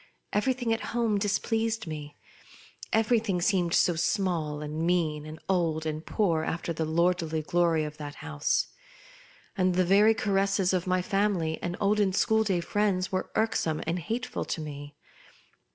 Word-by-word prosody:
Everything 245 +1 +1
at 225 - -2 0.2
home 220 -4 +2
displeased 220 +2 0
me. 150 -2 -7 0.7
Everything 220 -4 +2
seemed 175 -2 +1
so 175 - +4
small 165 -4 0
and 150 +1 -4
mean, 160 -3 0
and 155 +1 -9
old 165 -4 0
and 155 0 -3
poor 170 -7 +1
after 170 +1 -3
the 160 0 -2
lordly 165 -1 +1
glory 170 -1 +2
of 150 0 -6
that 145 -1 -7
house; 155 -2 -1 0.9
and 185 -2 +2
the 185 0 +3
very 205 +4 +5
caresses 195 -3 +1
of 185 -1 0
my 185 0 +1
family 190 -5 0
and 175 0 -3
olden 205 -1 +2
school 220 +3 +3
day 190 -5 0
friends 190 0 0
were 185 - -2
irksome 165 -8 +1
and 170 +2 -1
hateful 230 +8 -3
to - - -3
me. 145 -1 -7
180 Hz, 150 wpm, -28 LUFS, 160-205 Hz, 0.9 s, very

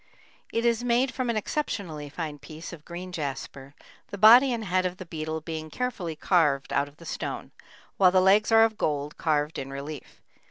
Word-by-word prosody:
It 230 +1 -1
is 235 0 +2
made 245 +2 +2
from 255 -2 -2
an 230 - 0
exceptionally 185 - -3
fine 150 -1 -5
piece 155 +4 -9
of 155 -3 -11
green 180 +1 -7
jasper, 140 -3 -6 0.3
the 200 - -7
body 240 +6 +8
and 230 -2 -2
head 185 0 +1
of 180 0 -3
the 185 - -8
beetle 160 -1 -4
being 155 0 -6
carefully 190 -8 -3
carved 150 -5 +1
out 140 +1 +1
of 145 +1 -17
the 165 - -14
stone, - - -5 0.5
while 185 -2 +6
the 185 +1 +4
legs 200 +4 +4
are 225 0 +7
of 220 -1 0
gold, 145 0 -1
carved 150 -1 0
in 135 - -6
relief. 140 +1 -8
170 Hz, 195 wpm, -27 LUFS, 150-215 Hz, 0.5 s, body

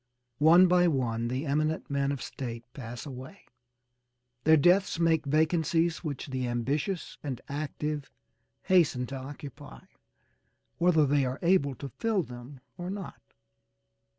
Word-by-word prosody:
One 170 +5 +7
by 180 0 +4
one 120 -6 0
the 130 +5 -2
eminent 155 +2 0
men 140 0 +1
of 140 -3 -4
State 120 -3 -6
pass 120 -1 -7
away. 130 +7 -9 1.0
Their 160 +1 +7
deaths 180 +5 +3
make 160 -3 +2
vacancies 160 +2 +1
which 145 -5 -4
the 130 -1 -2
ambitious 140 +9 -2
and 135 -5 -4
active 150 0 -4 0.5
hasten 160 -9 +3
to 135 - -7
occupy 135 - -9 1.0
whether 170 -3 +4
they 145 0 +2
are 130 0 -2
able 170 -6 +3
to 140 +3 -7
fill 220 -5 +1
them 125 +1 -11 0.2
or 175 +1 -4
not. 195 -2 -7
145 Hz, 130 wpm, -29 LUFS, 130-165 Hz, 1.0 s, One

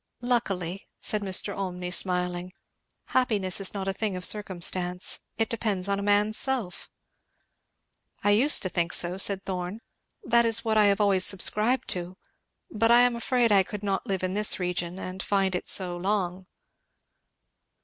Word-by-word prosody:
"Luckily," 195 -7 -2
said 215 - -1
Mr. 195 0 +1
Olmney 180 -2 -5
smiling, 180 0 0 0.6
"happiness 205 -7 +1
is 195 - +2
not 195 -1 -4
a 195 - -1
thing 205 -1 -3
of 180 0 -3
circumstance; 180 -2 +1 0.2
it 225 0 0
depends 210 -5 -1
on 200 0 -1
a - - -4
man's 205 +1 +2
self." 245 -10 -3 1.3
"I 205 - +3
used 255 +9 +4
to 185 - -1
think 175 -1 -2
so," 175 +1 +2
said 195 -1 +2
Thorn; 185 +2 -5 0.4
"that 235 -7 +3
is 230 0 +2
what 220 -1 0
I 215 -1 +5
have 200 0 +2
always 195 -2 +3
subscribed 215 +7 +1
to; 180 +1 -3 0.5
but 225 +1 +1
I 240 +1 +6
am 245 -1 +2
afraid 235 -1 0
I 200 -1 +5
could 205 +2 -7
not 195 -1 -2
live 190 -2 -3
in 185 0 -2
this 210 0 +3
region 180 0 -3
and 185 0 -7
find 195 -1 0
it 180 - -2
so 180 -2 +1
long." 185 -1 -3
195 Hz, 165 wpm, -26 LUFS, 180-215 Hz, 1.3 s, I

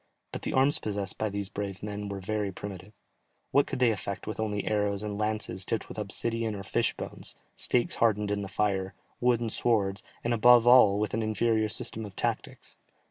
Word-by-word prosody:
But - - -5
the - - -3
arms 135 +2 +4
possessed 100 -3 -3
by 110 - 0
these 100 -1 -3
brave 100 -1 -5
men 105 -1 -4
were 100 -1 -4
very 105 +1 -2
primitive. 95 +1 -8 0.6
What 140 - +4
could - - -3
they 125 -2 +4
effect 100 -2 -4
with 110 - -5
only 105 -2 -1
arrows 105 -1 0
and 105 -1 -3
lances 105 -3 -2
tipped 115 - -2
with - - -7
obsidian 115 +2 -2
or 100 - -6
fish - - 0
bones, - - -7 0.2
stakes 120 -1 0
hardened 105 -3 +2
in 100 0 0
the 100 - -4
fire, 95 -2 -1 0.2
wooden 120 -2 +2
swords, 105 -4 +1 0.2
and 120 - +1
above 120 +1 +6
all 120 -5 +7
with 105 0 -1
an 115 - 0
inferior 110 0 +1
system 110 +1 -3
of 100 -3 -9
tactics? - - -4
105 Hz, 190 wpm, -29 LUFS, 100-115 Hz, 0.6 s, all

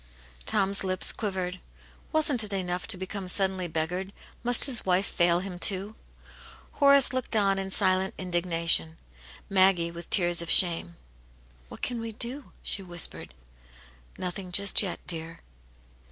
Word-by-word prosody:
'* - - -26
Tom*s 195 0 +1
lips 185 -1 +3
quivered. 185 -3 -5 0.5
Wasn't 295 -7 0
it 205 -1 -6
enough 180 -2 -4
to 220 - 0
become* 190 +1 -7
suddenly 190 -1 -1
beggared; 175 +4 -4 0.3
must 245 0 +5
his 255 -5 +1
wife 185 +1 0
fail 175 -1 0
him, 185 -2 -8
too? 195 +2 +2 0.8
Horace 280 -2 +4
looked 255 -2 -2
on 195 -2 +1
in 195 0 -5
silent 190 -1 +2
indignation, 170 -3 0 0.5
Maggie* 185 -3 +2
with 170 0 -11
tears 175 -2 +2
of 170 - -8
shame. 165 - +3 0.7
"What - - -13
can 240 -2 -4
we 230 -1 -7
do 250 +6 -5
?" - - -31
she 200 - 0
whispered; 175 - 0 0.8
"Nothing 180 0 -6
just 200 +2 +4
yet, 190 -4 -4
dear." 165 -1 -2
190 Hz, 145 wpm, -26 LUFS, 175-200 Hz, 0.8 s, must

